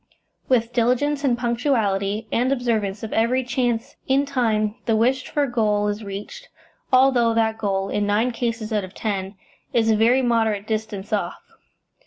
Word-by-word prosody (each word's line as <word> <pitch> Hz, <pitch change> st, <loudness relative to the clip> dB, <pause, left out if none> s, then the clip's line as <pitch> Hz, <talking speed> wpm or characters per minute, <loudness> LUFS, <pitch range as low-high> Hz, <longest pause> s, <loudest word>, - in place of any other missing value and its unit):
With 240 Hz, -2 st, +2 dB
diligence 255 Hz, +5 st, +1 dB
and 250 Hz, -4 st, +2 dB
punctuality, 225 Hz, -4 st, 0 dB
and 250 Hz, +3 st, +1 dB
observance 220 Hz, -6 st, -1 dB
of 220 Hz, -, -5 dB
every 245 Hz, +4 st, +2 dB
chance, 240 Hz, 0 st, -2 dB
in 275 Hz, +2 st, +3 dB
time 220 Hz, -6 st, 0 dB
the 225 Hz, -, +3 dB
wished 255 Hz, +4 st, +1 dB
for 290 Hz, -1 st, 0 dB
goal 210 Hz, -5 st, +1 dB
is 205 Hz, +1 st, -4 dB
reached, 210 Hz, -, -8 dB, 0.4 s
although 255 Hz, -3 st, +4 dB
that 220 Hz, -1 st, +1 dB
goal, 195 Hz, -2 st, -1 dB
in 205 Hz, 0 st, -1 dB
nine 220 Hz, +5 st, +2 dB
cases 230 Hz, -2 st, -3 dB
out 210 Hz, -2 st, +1 dB
of 185 Hz, +1 st, -10 dB
ten, 195 Hz, -2 st, -3 dB, 0.4 s
is 225 Hz, -1 st, +3 dB
a -, -, +4 dB
very 240 Hz, +5 st, +3 dB
moderate 225 Hz, -4 st, +1 dB
distance 215 Hz, -2 st, -4 dB
off. 185 Hz, -4 st, -1 dB
225 Hz, 160 wpm, -22 LUFS, 210-250 Hz, 0.4 s, although